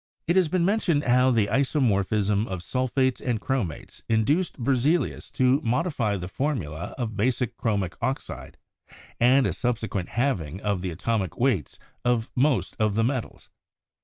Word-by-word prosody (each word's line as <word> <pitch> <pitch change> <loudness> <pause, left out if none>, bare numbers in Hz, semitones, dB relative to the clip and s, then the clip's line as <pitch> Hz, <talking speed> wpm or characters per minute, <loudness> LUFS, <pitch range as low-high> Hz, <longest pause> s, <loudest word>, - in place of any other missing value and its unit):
It 170 - +1
has 185 -3 +4
been 170 +2 +1
mentioned 185 -7 +1
how 125 +1 +4
the 115 -5 +3
isomorphism 105 -5 +1
of 95 -2 -5
sulphates 130 +1 0
and 120 -4 -1
chromates 115 - -3
induced 140 +11 +1
Berzelius 140 +6 0
to 130 +3 +3
modify 125 - 0
the 90 -1 -5
formula 95 - -3
of 115 -4 -3
basic 120 +2 0
chromic 100 -7 -1
oxide 130 +3 -4 0.6
and 130 +3 +5
to - - +1
a - - -2
subsequent 110 -7 -2
halving 100 - -1
of 100 -4 -1
the 95 - -2
atomic 95 +2 -2
weights 120 - 0 0.3
of 120 -2 0
most 135 0 +1
of 105 -2 +1
the 115 - +2
metals. 125 0 -3
120 Hz, 150 wpm, -25 LUFS, 105-135 Hz, 0.6 s, and